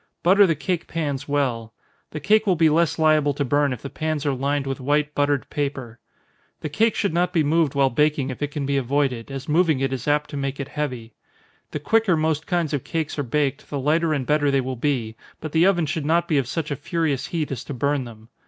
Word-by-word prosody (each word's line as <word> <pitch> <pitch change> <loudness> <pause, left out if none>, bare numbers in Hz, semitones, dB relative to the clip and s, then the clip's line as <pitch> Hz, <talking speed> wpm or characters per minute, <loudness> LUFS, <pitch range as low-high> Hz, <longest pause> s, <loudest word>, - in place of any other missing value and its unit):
Butter 195 +3 +6
the 165 - +1
cake 175 +3 -3
pans 145 -4 -3
well. 125 -6 -1 0.3
The 155 - -6
cake 215 +7 +3
will 185 - +4
be 165 -1 +4
less 165 0 +2
liable 155 -3 +3
to 145 - -1
burn 145 +2 +2
if 125 - -6
the 140 - -5
pans 155 -2 -2
are 140 - +1
lined 140 +2 -1
with 135 0 -3
white 145 +3 0
buttered 145 -1 0
paper. 130 -5 -4 0.6
The 155 - -4
cake 220 +9 +2
should 200 -5 0
not 180 +1 +1
be 165 -3 +2
moved 155 -1 +1
while 135 -1 +3
baking 145 0 +1
if 130 - -9
it 145 - -1
can 145 -1 -4
be 140 0 0
avoided, 135 -2 -1
as 135 -1 -6
moving 160 -2 +2
it 135 0 -1
is 130 0 -5
apt 150 0 +1
to 145 - -5
make 140 0 -3
it 140 -1 -4
heavy. 125 -7 -4 0.6
The 150 - -4
quicker 215 +2 +2
most 155 0 -1
kinds 170 -4 0
of 140 - -1
cake 160 -2 -3
are - - +2
baked, 140 +1 -1
the 145 - -3
lighter 160 +4 +1
and 140 -4 -1
better 150 0 +2
they 140 -1 +2
will 130 0 -3
be; 120 -4 -1 0.2
but 155 - -6
the 165 +4 +4
oven 175 -4 +2
should 155 +1 -2
not 170 +2 +2
be 150 -4 +2
of 130 - -2
such 150 +2 -3
a - - 0
furious 150 -3 -2
heat 160 -4 -3
as 130 -2 -4
to 145 - -6
burn 140 +2 0
them. 110 -1 -13
145 Hz, 240 wpm, -23 LUFS, 135-160 Hz, 0.6 s, Butter